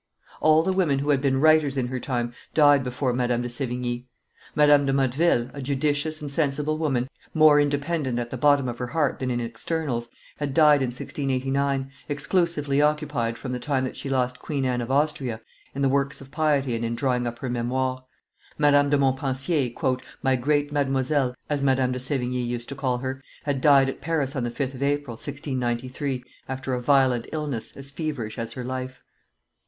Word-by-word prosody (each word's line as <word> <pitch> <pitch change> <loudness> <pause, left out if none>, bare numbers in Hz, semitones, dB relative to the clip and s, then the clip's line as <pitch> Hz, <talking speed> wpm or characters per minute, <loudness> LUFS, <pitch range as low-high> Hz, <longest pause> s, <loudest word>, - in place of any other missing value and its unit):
All 155 +1 +5
the 190 +2 +1
women 175 -7 +2
who 145 +2 +1
had 140 -2 +2
been 135 -1 +2
writers 155 -2 +4
in 125 -2 0
her 130 0 -3
time 120 -2 -2 0.2
died 145 -2 +6
before 125 0 -1
Madame 120 -1 0
de 120 - -3
Sevigne. 125 -1 -3 0.5
Madame 145 -1 +5
de - - +2
Motteville, 135 -1 +2
a 140 - -6
judicious 145 +3 -1
and 145 -2 -5
sensible 150 +1 0
woman, 135 -6 0 0.3
more 155 -2 +7
independent 145 -2 -1
at 120 -1 -3
the - - -3
bottom 145 0 +4
of 120 -1 -5
her 125 - -2
heart 150 +1 0
than 130 - -2
in 120 -1 0
externals, 120 +1 -3 0.3
had 140 -2 -3
died 150 -3 +6
in 130 - +1
1689, 135 +1 -1 0.2
exclusively 145 -1 +1
occupied, 145 -6 0
from 125 - -6
the 125 - -2
time 135 0 0
that 130 - -4
she 140 - -5
lost 125 -2 0
Queen 140 -3 -2
Anne 125 -1 0
of 120 - -5
Austria, 135 -5 0 0.4
in 140 0 +2
works 140 +1 0
of 135 0 -13
piety 145 -5 +1
and 115 - -3
in 115 0 -1
drawing 125 -1 0
up 120 0 -5
her 130 - -5
Memoires. 130 +2 -1 0.6
Mdlle. 145 -1 +4
de 145 - +3
Montpensier, 135 -1 0 0.3
"my 135 -1 +3
great 145 +3 +1
Mademoiselle," 135 -2 +1
as 145 -2 -1
Madame 130 -2 +2
de 125 - -3
Sevigne 125 -1 -1
used 120 0 -4
to 140 - -5
call 130 -3 0
her, 130 +1 -4 0.2
had 140 -3 -1
died 140 -2 +6
at 135 - -5
Paris 150 -2 -1
on 130 - -1
the 120 - -1
5th 135 +2 -3
of 130 - -9
April, 145 -2 0
1693, 130 0 -3 0.3
after 130 0 -3
a 125 - -1
violent 130 -3 +3
illness, 150 -7 -4
as 140 0 -7
feverish 140 -8 -4
as 115 0 -4
her 125 - -5
life. 130 +1 -5
135 Hz, 190 wpm, -25 LUFS, 125-145 Hz, 0.6 s, more